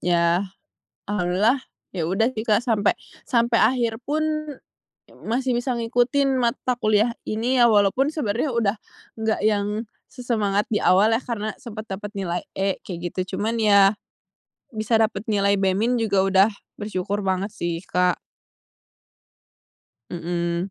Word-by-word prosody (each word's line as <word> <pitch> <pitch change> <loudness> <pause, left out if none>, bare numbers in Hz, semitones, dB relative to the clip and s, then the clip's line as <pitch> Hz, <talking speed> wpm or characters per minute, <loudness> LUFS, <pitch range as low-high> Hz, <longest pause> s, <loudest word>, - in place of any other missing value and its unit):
ya. 170 0 +2 0.7
Alhamdulillah 205 +7 +1 0.3
ya 165 - -1
udah 195 +8 +1
sih, 215 - -4
Kak, 210 -1 +3
sampe 220 -4 +2 0.3
sampe 235 -2 +2
akhir 235 -3 +2
pun 305 +2 -1 0.9
ya - - -19
masih 250 +2 0
bisa 250 +2 -1
ngikutin 245 +4 +1
mata 240 +2 0
kuliah 215 +2 +2
ini 235 +4 0
ya 240 - +7
walaupun 210 +7 +3
sebenarnya 240 -1 -1
udah 220 -2 +1 0.4
enggak 220 0 0
yang 205 -2 +2 0.4
sesemangat 215 -5 -1
di 210 - +2
awal 195 +4 +5
yah 230 - -1
karena 215 -3 -3
sempat 220 -4 -8
dapat 205 +2 -6
nilai 175 -2 -2
"E" 195 0 0
kayak 175 -3 -6
gitu. 185 0 -3
Cuman 225 +3 -1
iya 200 -1 +5 0.8
bisa 220 +1 -1
dapat 220 -1 -1
nilai 200 -1 +3
"B-" 200 +6 +1
juga 200 -4 +2
udah 195 +2 +4 0.3
bersyukur 205 0 -3
banget 190 +1 0
sih, 170 -4 -3
Kak. 180 -1 +1 1.9
Mhm. 170 +1 -2
210 Hz, 135 wpm, -23 LUFS, 195-235 Hz, 1.9 s, ya